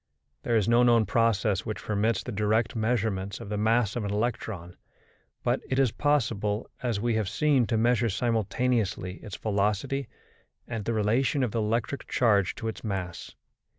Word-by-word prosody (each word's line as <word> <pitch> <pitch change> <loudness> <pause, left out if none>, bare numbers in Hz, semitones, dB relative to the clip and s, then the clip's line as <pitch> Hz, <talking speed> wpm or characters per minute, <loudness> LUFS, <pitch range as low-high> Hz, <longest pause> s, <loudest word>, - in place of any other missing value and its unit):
There 120 - 0
is 105 -4 +2
no 120 +1 +5
known 120 -2 +5
process 105 -4 +1
which 110 - -5
permits 105 0 0
the 125 - -5
direct 110 +3 +1
measurement 110 -4 -1
of - - -8
the 105 - -2
mass 110 0 +2
of 120 - -2
an 100 - -2
electron, 105 -5 -3 0.7
but - - +1
it 130 - 0
is 135 -4 +3
possible, 110 -8 0
as 120 -5 -1
we 120 +2 0
have 110 -3 0
seen, 135 0 +2
to 115 - 0
measure 115 0 +2
simultaneously 110 -3 0
its 105 - -8
velocity 110 +6 -1 0.6
and 115 -4 -4
the 115 - 0
relation 120 +6 +1
of 120 - 0
the 115 - -1
electric 115 +5 -1
charge 100 -6 +2
to 115 - -5
its 110 - -5
mass. 95 -5 -5
110 Hz, 170 wpm, -27 LUFS, 105-120 Hz, 0.7 s, no